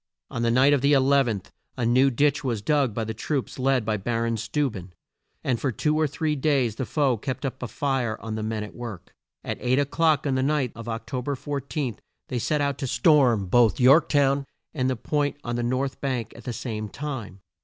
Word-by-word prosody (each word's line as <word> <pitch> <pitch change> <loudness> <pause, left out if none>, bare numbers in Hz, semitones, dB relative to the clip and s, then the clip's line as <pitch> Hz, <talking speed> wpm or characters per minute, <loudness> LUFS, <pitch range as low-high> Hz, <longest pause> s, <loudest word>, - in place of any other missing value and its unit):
On 115 - -3
the 120 - +2
night 130 +4 +5
of 140 - +2
the 140 +2 +4
11th, 135 -7 +2 0.3
a 125 - 0
new 130 +4 +4
ditch 145 +3 +1
was 115 -6 -2
dug 145 -3 +2
by 115 +2 -3
the 110 0 -4
troops 135 +4 -3
led 130 -3 +2
by 110 -1 0
Bar 115 +3 -1
on 115 0 0
Steu 125 +7 0
ben, 90 -3 -9 0.5
and 125 -3 0
for 135 - 0
two 150 +6 0
or 155 0 +2
three 150 +2 -1
days 135 -6 +1
the 130 - -3
foe 140 -6 +1
kept 130 +5 -4
up 130 0 -4
a - - -3
fire 130 -6 -1
on 110 -1 -6
the 110 - -3
men 110 0 -2
at 105 - -9
work. 115 -7 -8 0.3
At - - -4
eight 125 +1 +2
o'clock 150 +1 +2
on 140 - +1
the 130 - +1
night 135 -3 +1
of 115 0 -8
Oc 115 0 -4
to 130 -2 -3
ber 140 +3 -2
14, 140 -3 -4 0.3
they 125 - -1
set 150 +5 0
out 140 -1 -1
to 135 - -2
storm 125 - +4
both 115 +5 +3
York 135 +5 +6
town 140 -1 +2 0.3
and 130 -4 0
the 130 - 0
Point 145 +4 -1
on 120 0 -3
the 120 - -1
north 130 +3 -1
bank 130 -5 -2
at 120 - -13
the 125 - -2
same 110 -2 -4
time. 125 -10 -6
130 Hz, 230 wpm, -25 LUFS, 115-140 Hz, 0.5 s, York